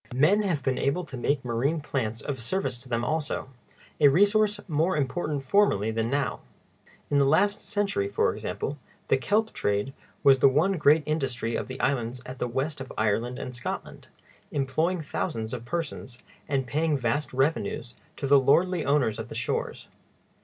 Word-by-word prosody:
Men 165 +11 +4
have 170 -9 -1
been 130 -1 0
able 155 +6 0
to 140 - -9
make 130 +2 -1
marine 125 +7 0
plants 115 -7 -3
of 140 -3 -4
service 130 -1 -2
to 130 +1 -12
them 120 0 0
also—a 145 -1 -2
resource 205 +6 +4
more 160 +2 +1
important 145 0 -1
formerly 130 - +3
than 115 +1 -1
now. 140 +1 -1 0.7
In 145 - +4
the - - +5
last 200 +9 +3
century, 200 - -1
for - - +1
example, 145 +1 -4 0.3
the - - +4
kelp 215 +10 0
trade 105 +6 -1 0.3
was 135 -2 +6
the 135 - +7
one 155 +9 +2
great 150 +1 +5
industry 130 -7 -1
of - - -3
the 130 0 -7
islands 125 -2 0
at 130 +1 -8
the 125 - 0
west 135 +4 -2
of 135 - -7
Ireland 115 +4 0
and 125 - -6
Scotland, 120 - -6 0.4
employing 155 +6 0
thousands 115 -5 -3
of 120 -2 -5
persons, 150 -4 -4 0.3
and 135 -2 0
paying 150 +3 0
vast 135 +4 -1
revenues 135 -3 -1 0.2
to - - -3
the 140 +1 +6
lordly 170 +6 +3
owners 140 -7 +1
of - - -6
the - - -8
shores. - - -3
140 Hz, 170 wpm, -27 LUFS, 125-160 Hz, 0.7 s, the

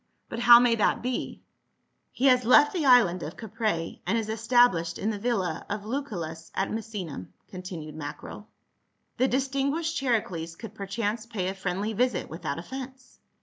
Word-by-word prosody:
" - - -47
But 230 - -5
how 240 0 +9
may 245 -1 +4
that 225 0 +1
be 250 0 -4 0.2
?" - - -48
" - - -48
He 265 - -2
has 255 -2 +5
left 255 +5 +6
the 325 -6 0
island 225 -9 +5
of 160 - -7
Caprae, 215 -6 -3
and 220 +5 +2
is 220 -1 -2
established 220 -7 +3
in 215 - -1
the 205 - -5
villa 200 -8 -1
of 205 0 -4
Lucullus 180 - -5
at 195 - -1
Misenum," 205 - -5 0.2
continued 180 -5 -7
Macro. 155 +7 -8 0.3
" - - -48
The 260 - +4
distinguished 275 +5 -1
Charicles 190 -11 -1
could 220 +2 -9
perchance 210 +2 -3
pay 190 -5 -2
a - - -3
friendly 195 +3 -3
visit 245 -3 0
without 155 -3 -4
offence." 260 +7 -9
220 Hz, 175 wpm, -27 LUFS, 180-245 Hz, 0.3 s, how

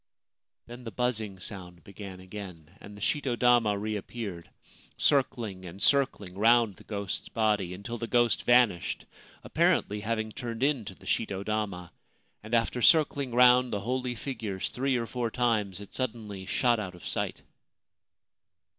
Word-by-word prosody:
Then 120 +1 -10
the 115 - -5
buzzing 110 -5 -2
sound 90 -3 -8
began 100 -2 -9
again, 90 -3 -9
and 105 0 -11
the - - -12
shito 135 0 0
dama 120 -4 +4
reappeared, 105 -3 -5 0.5
circling 115 -9 +1
and 90 +2 -9
circling 115 -9 +2
round 115 -2 +4
the - - -14
ghost's 100 -3 -4
body, 105 -5 +1
until 115 +5 -6
the 115 - -3
ghost 120 -1 +3
vanished, 120 -8 +3 0.4
apparently 105 +1 +2
having 110 0 -2
turned 115 +1 -4
into 125 -10 0
the - - -18
shito 100 -3 -1
dama; 100 -5 -2 0.5
and 110 +2 -2
after 115 +2 +1
circling 145 -2 +4
round 125 0 +6
the 100 - -2
holy 125 +2 -2
figures 110 -7 -4
three 130 0 0
or 115 - -2
four 120 0 -2
times 110 -6 0
it 100 - -11
suddenly 110 -6 -4
shot 120 +1 +2
out 90 -4 -5
of 90 - -13
sight. - - -3
110 Hz, 145 wpm, -29 LUFS, 100-120 Hz, 0.5 s, round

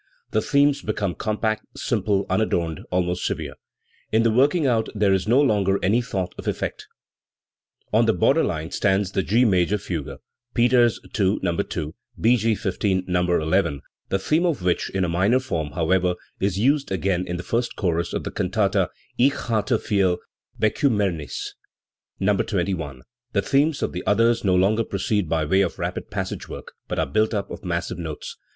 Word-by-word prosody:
The 110 - +2
themes 140 +2 +3
become 105 -5 -2
compact, 110 +1 -2
simple, 100 -2 0
unadorned, 85 -5 0
almost 90 0 0
severe; - - -3 0.6
in 110 +1 +3
the 115 - +3
working 140 +7 +3
out 115 -4 +1
there 100 -2 +3
is 95 +1 0
no 120 +5 +5
longer 100 -8 +3
any 110 +6 +3
thought 95 -7 -3
of - - -7
effect. - - -3 1.1
On - - +4
the - - +4
border - - +3
line 80 +1 -3
stands 95 -1 +1
the 95 - +1
G 115 +7 +3
major 95 -1 +2
fugue 85 -7 -5 0.4
(Peters 120 -1 +4 0.2
II, 100 0 +3
No. 85 -2 +1
2; 75 -2 -3 0.3
B. 120 +3 +5
G. 115 -1 +1
XV, 95 -2 -1
No. 90 -1 +1
n), 80 -3 +1 0.3
the 95 - +1
theme 155 - +1
of 150 - -1
which, 90 -1 +1
in 95 - -1
a - - -1
minor 95 +9 +2
form, 80 - -3
however, 90 +1 +1 0.2
is 95 -1 0
used 140 +5 +2
again 95 -1 0
in 90 - -3
the 90 - -6
first 120 +6 -1
chorus 85 -4 -1
of - - -3
the - - -4
cantata - - +1 0.3
Ich 135 +3 +5
hatte 115 -2 0
viel 95 -4 +2 0.4
Bekiimmernis 105 - 0 0.7
(No, 100 +1 +2
21). 85 - -2 0.3
The 100 - +1
themes 140 +7 +2
of - - -1
the 90 - -4
others 115 +3 +3
no 95 -3 +3
longer 100 +5 +3
proceed 100 -3 -1
by 80 -1 +1
way 95 +6 +3
of 90 -4 -1
rapid - - -4
passage - - -4
work, - - -9
but - - -3
are - - +2
built 110 - +1
up 100 - -3
of - - -8
massive 85 -1 -3
notes. 80 -3 -6
100 Hz, 175 wpm, -23 LUFS, 90-115 Hz, 1.1 s, no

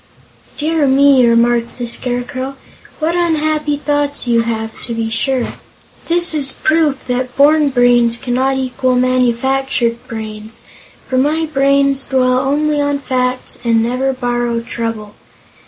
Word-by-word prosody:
"Dear 310 -1 0
me!" 270 -1 +5
remarked 235 0 +1
the 245 - -4
Scarecrow, 250 +2 -4 0.4
"what 320 +2 -1
unhappy 310 -3 0
thoughts 290 -2 -1
you 235 -1 +3
have, 225 -1 -4
to 235 - -5
be 225 -1 -3
sure. 250 +2 -1 0.5
This 345 0 +3
is 280 -3 +4
proof 310 -3 0
that 250 0 -3
born 295 +1 +4
brains 245 -2 +3
cannot 260 +2 -1
equal 255 -1 -1
manufactured 255 0 0
brains, 220 -1 -8 0.5
for 255 - 0
my 310 +4 +1
brains 275 -2 +1
dwell 255 -1 +2
only 295 +2 0
on 285 0 0
facts 255 -2 -2
and 230 -1 +2
never 255 +3 -1
borrow 240 -2 -2
trouble. 225 -3 -5
255 Hz, 130 wpm, -15 LUFS, 240-285 Hz, 0.5 s, me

